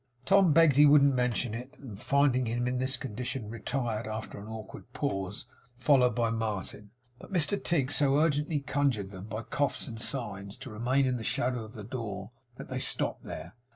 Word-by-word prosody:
Tom 195 -4 +5
begged 155 -3 +5
he 150 - +8
wouldn't 140 -1 +6
mention 125 -2 0
it; 125 +5 -7
and 110 -7 -10
finding 135 -3 +3
him 120 +2 -1
in 125 0 -1
this 130 +1 0
condition, 125 -2 -4
retired, 115 -2 -2
after 110 -1 -5
an 100 - -9
awkward 110 -2 -9
pause, 95 +3 -3 0.3
followed 125 -1 +4
by 115 -1 +1
Martin. 105 -2 -4 0.3
But - - -13
Mr 190 +3 0
Tigg 145 -6 +1
so 140 -1 +3
urgently 150 0 +2
conjured 135 -9 0
them, 95 -1 -8
by 110 +1 -5
coughs 145 +5 -1
and 115 -3 -7
signs, 100 -7 -3
to - - -9
remain 125 +5 +1
in 130 -1 0
the 115 - -6
shadow 125 -2 0
of 110 +1 -11
the 110 -4 -8
door, 105 -3 -5 0.2
that - - -9
they 130 0 -3
stopped - - 0
there. 85 +4 -7
125 Hz, 190 wpm, -30 LUFS, 110-140 Hz, 0.3 s, he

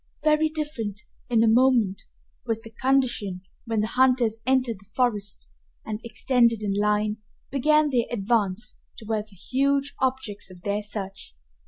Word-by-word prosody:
Very 310 0 +3
different, 270 -10 -4 0.3
in 230 -2 +4
a - - +4
moment, 230 -4 +3 0.4
was 225 -2 -2
the 225 - -11
condition 240 -7 0 0.2
when 225 -2 0
the - - +1
hunters 245 -2 +2
entered 255 -5 +2
the 195 0 -21
forest 215 -5 -1 0.3
and, 215 0 -4
extended 235 -1 +2
in 200 -1 0
line, 210 +1 +1 0.3
began 300 +2 +3
their 240 -3 +2
advance 220 -1 0 0.2
toward 215 -1 -2
the 210 -2 -18
huge 275 +7 0
objects 245 -7 -1
of 180 -1 -13
their 205 +1 -1
search. 195 -2 -7
225 Hz, 145 wpm, -25 LUFS, 210-260 Hz, 0.4 s, in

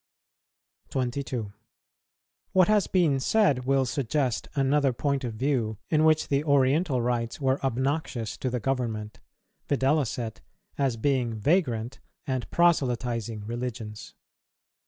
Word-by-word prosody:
22. 125 -4 -3 1.0
What 185 -2 +5
has 210 -2 +3
been 165 -7 +2
said 140 - +2
will 135 0 +2
suggest 130 0 -1
another 140 -1 +2
point 140 +2 -1
of 115 -3 -4
view 120 -4 0
in 155 -1 +4
which 155 0 +3
the 140 +1 +1
Oriental 140 -1 +2
rites 120 0 -1
were 135 -1 0
obnoxious 130 -3 -1
to 130 - -2
the 125 0 -2
government, 115 -4 -3 0.5
viz., 135 -3 +1 0.6
as 135 -4 +1
being 125 -2 0
vagrant 120 - 0 0.3
and 130 -4 -3
proselytizing 120 -9 +1
religions. 115 -2 -6
130 Hz, 115 wpm, -27 LUFS, 120-145 Hz, 1.0 s, What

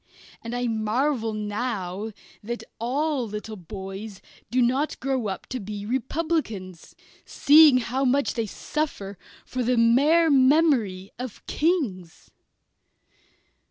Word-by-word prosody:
And 230 +1 -5
I 245 0 -1
marvel 225 +2 0
now 210 -2 -3 0.3
that 235 +3 -5 0.2
all 265 +2 -1
little 210 +1 -6
boys 195 +2 -8 0.3
do 255 - 0
not 260 +5 +1
grow 260 -4 -1
up 190 -2 -5
to 255 - -3
be 205 -1 -6
Republicans, 250 - -3 0.3
seeing 295 -2 +6
how 250 +2 -1
much 275 +2 +2
they 230 -2 -2
suffer 200 - -4 0.3
for 255 - -4
the 245 +1 +1
mere 290 +8 +4
memory 260 - +3
of 250 -3 -7
Kings. 240 - -2
235 Hz, 115 wpm, -25 LUFS, 210-275 Hz, 0.3 s, seeing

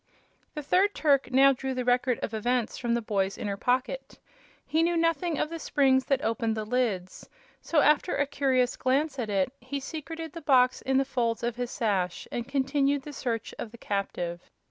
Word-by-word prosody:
The 300 - -4
third 380 +7 +2
Turk 285 -3 +2
now 275 +2 +6
drew 265 0 -4
the 250 -1 -2
Record 245 0 +2
of 225 - -3
Events 240 +1 0
from 235 -2 -1
the 235 - -2
boy's 195 -2 -1
inner 200 -2 -3
pocket. 255 - -1 0.5
He 320 - +1
knew 340 +1 +2
nothing 330 0 +1
of 305 - -1
the 330 - -5
springs 265 -4 +2
that 275 - 0
opened 225 -1 0
the 215 - -3
lids, 210 -6 -2 0.3
so, 315 -3 +2
after 300 +5 +3
a 285 - +2
curious 265 -3 +1
glance 275 +2 0
at 225 -3 -2
it, 200 +5 0
he 255 +3 -5
secreted 320 +3 -7
the 335 - -7
box 255 -4 +3
in 265 0 +1
the 270 - +3
folds 235 -4 -1
of 240 -1 -1
his 245 0 -3
sash 190 -8 -1
and 240 0 -3
continued 275 0 +1
the 295 - -8
search 230 -5 -3
of 220 - -5
the 235 - -12
captive. 180 -5 -4
255 Hz, 195 wpm, -28 LUFS, 230-285 Hz, 0.5 s, now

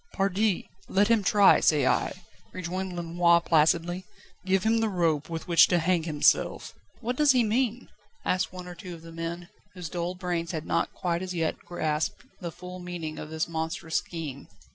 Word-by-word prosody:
"Pardi! 195 +1 +1 0.2
let 205 +2 +3
him 225 -3 +4
try, 200 0 +6
say 150 -4 +3
I," 180 +7 0 0.3
rejoined 185 +1 -4
Lenoir 170 0 +3
placidly. 170 +2 +2 0.4
"Give 190 0 +1
him 225 +1 +3
the 225 -1 +1
rope 165 -6 0
with 165 +1 -5
which 170 -2 +7
to 175 - +2
hang 175 +1 +2
himself." 150 -3 +2 0.3
"What 245 +2 -2
does 295 0 +5
he 250 -2 +4
mean?" 235 +2 0 0.4
asked 185 +1 0
one 180 -1 -8
or 180 - -7
two 180 0 -8
of 165 - -14
the 165 - -10
men, 165 +2 -5 0.3
whose 175 -3 -6
dull 175 +1 -3
brains 175 -2 -3
had 160 -1 -4
not - - 0
quite 175 -1 -2
as 185 -1 -4
yet 165 -2 -1
grasped 155 -3 -2
the 170 -2 -5
full 180 +2 -9
meaning 175 -3 -6
of 155 - -7
this 160 0 -2
monstrous 160 +1 -2
scheme. 150 -5 -5
175 Hz, 185 wpm, -27 LUFS, 165-185 Hz, 0.4 s, which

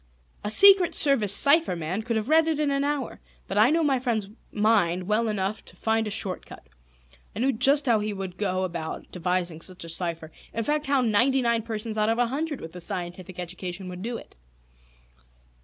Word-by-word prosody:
A 210 - -2
Secret 390 - +7
Service 260 -9 +4
cipher 285 - +5
man 170 +5 -3
could 230 +1 -3
have 220 0 -2
read 320 +2 +4
it 315 -2 -1
in 295 -2 0
an 275 0 0
hour. 285 -3 -3 0.3
But 195 - -1
I 220 +4 +6
knew 325 +2 +2
my 275 -4 +1
friend's 225 -5 -2 0.2
mind 205 -5 +1
well 215 +4 0
enough 205 0 -3
to - - -15
find 220 0 -1
a - - -3
short 200 -3 -3
cut. - - -14 0.7
I - - -5
knew 270 +2 +2
just 275 +5 +3
how 230 -4 +3
he 210 0 -3
would 190 -2 -7
go 185 -2 -1
about 170 -3 -6
devising 180 -2 -2
such 185 -1 -7
a - - -9
cipher, 165 -2 -3 0.2
in 230 - -1
fact, 295 +3 -1
how 275 -1 +2
ninety 250 +4 +2
nine 235 -1 +1
persons 220 -1 -5
out 215 +1 +2
of 225 - +1
a 245 - +2
hundred 290 +4 -4
with 160 +2 -10
a 180 - -8
scientific 180 0 -6
education 180 +1 -6
would 180 0 -8
do 235 +3 -4
it. - - -14
215 Hz, 205 wpm, -25 LUFS, 185-265 Hz, 0.7 s, Secret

